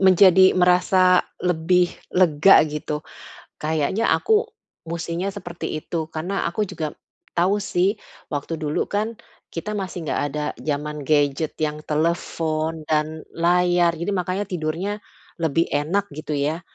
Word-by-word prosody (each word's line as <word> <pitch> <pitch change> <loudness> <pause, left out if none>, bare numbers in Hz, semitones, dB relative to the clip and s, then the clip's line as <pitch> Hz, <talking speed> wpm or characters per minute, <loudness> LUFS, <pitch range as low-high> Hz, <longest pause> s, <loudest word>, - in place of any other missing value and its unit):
menjadi 190 0 +7
merasa 180 0 +5 0.2
lebih 180 +1 +2 0.2
lega 180 0 +6
gitu. 150 0 -4 0.6
Kayaknya 160 +7 0
aku 440 +1 +3 0.4
mestinya 170 +2 -3
seperti 175 -5 -5
itu. 160 -2 -3
Karena 180 +5 -2
aku 190 +5 -1
juga 155 -5 -5 0.4
tahu 185 +4 +3
sih 195 +3 +1 0.3
waktu 145 +3 -3
dulu 150 -1 -1
kan, 215 +3 -1 0.4
kita 210 +6 -4
masih 185 -4 -5
enggak - - 0
ada 150 0 -2
zaman 150 0 -3
gadget 145 0 +1
yang 150 0 -1
telepon 160 0 -1
dan 155 0 0
layar. 175 0 +3
Jadi 170 +5 -3
makanya 185 +3 -1
tidurnya 180 +4 -3 0.4
lebih 165 0 +1
enak 170 +8 0
gitu 155 -1 -4
ya. 150 +5 -1
170 Hz, 125 wpm, -23 LUFS, 155-185 Hz, 0.6 s, menjadi